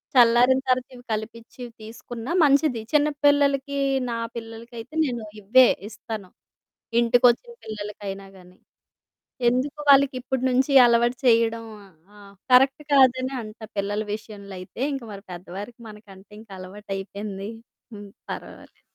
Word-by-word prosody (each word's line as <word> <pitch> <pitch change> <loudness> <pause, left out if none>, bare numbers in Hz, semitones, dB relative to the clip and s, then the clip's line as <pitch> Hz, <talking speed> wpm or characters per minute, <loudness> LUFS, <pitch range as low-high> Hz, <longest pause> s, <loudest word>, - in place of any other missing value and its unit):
చల్లారిన 245 +2 +6
తర్వాత 255 -1 +1
ఇవి 245 - -13
కలిపిచ్చి 230 +3 -7 0.2
తీసుకున్నా 230 +3 -8
మంచిది. 280 -4 +3
చిన్నపిల్లలకి 285 -2 +2 0.3
నా 230 - -2 0.2
పిల్లలకయితే 230 +3 -9
నేను 240 -5 -3 0.2
ఇవ్వే 250 +6 +6 0.2
ఇస్తాను. 215 -3 -8 0.7
ఇంటికొచ్చిన 245 - +3
పిల్లలకైనా 205 -2 -6
గాని, 180 0 -18 0.9
ఎందుకు 265 +5 -2
వాళ్ళకి 280 -1 +6
ఇప్పటి 260 0 -3
నుంచి 260 +3 +1
అలవాటు 240 +1 +3
చేయడం. 230 -1 +3 0.5
ఆహ్, 200 -1 -15 0.2
కరెక్ట్ 265 +3 +5
కాదని 260 -1 +4
అంట 215 -1 -11 0.2
పిల్లల 200 +1 -1 0.2
విషయంలో 205 -3 -10
అయితే, 185 +6 -9
ఇంక 270 -3 -5
మరి 195 0 -10
పెద్దవారికి 195 +7 -9
మనకంటే 205 -2 -15
ఇంకా 215 -3 -14
అలవాటయిపోయింది. 195 +1 -6 0.4
హ్మ్. 205 -1 -10 0.2
పర్వాలేదు. - - -9
230 Hz, 115 wpm, -24 LUFS, 205-255 Hz, 0.9 s, చల్లారిన